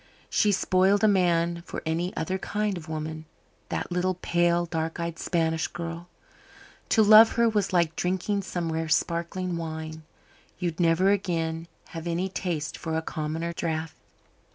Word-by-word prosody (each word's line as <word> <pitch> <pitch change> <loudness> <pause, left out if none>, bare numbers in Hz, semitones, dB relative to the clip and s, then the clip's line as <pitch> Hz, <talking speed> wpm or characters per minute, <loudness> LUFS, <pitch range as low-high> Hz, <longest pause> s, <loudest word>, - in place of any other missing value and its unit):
She 210 - +3
spoiled 195 +1 +3
a - - +7
man 170 -3 +2
for - - -6
any 170 +3 -1
other 185 +4 -1
kind 210 +1 -1
of 165 -2 -8
woman 155 0 -5 0.4
that - - -3
little 180 +1 0
pale, 175 0 +1
dark 165 0 -3
eyed 170 0 -4
Spanish 160 -2 0
girl. 170 0 -6 0.8
To 220 - +5
love 215 +2 +8
her 235 0 +3
was 210 -3 +1
like 170 -3 +2
drinking 190 +3 -1
some 175 -3 -3
rare 160 0 -2
sparkling 170 +2 0
wine. 160 -1 -5 0.6
You'd 175 -2 -3
never 175 +3 +4
again 165 -4 -1 0.2
have 165 0 -6
any 175 +3 -1
taste 175 -5 -3
for 160 0 -2
a 160 - -2
commoner 160 +2 -3
draught. 160 -1 -3
170 Hz, 155 wpm, -27 LUFS, 160-185 Hz, 0.8 s, love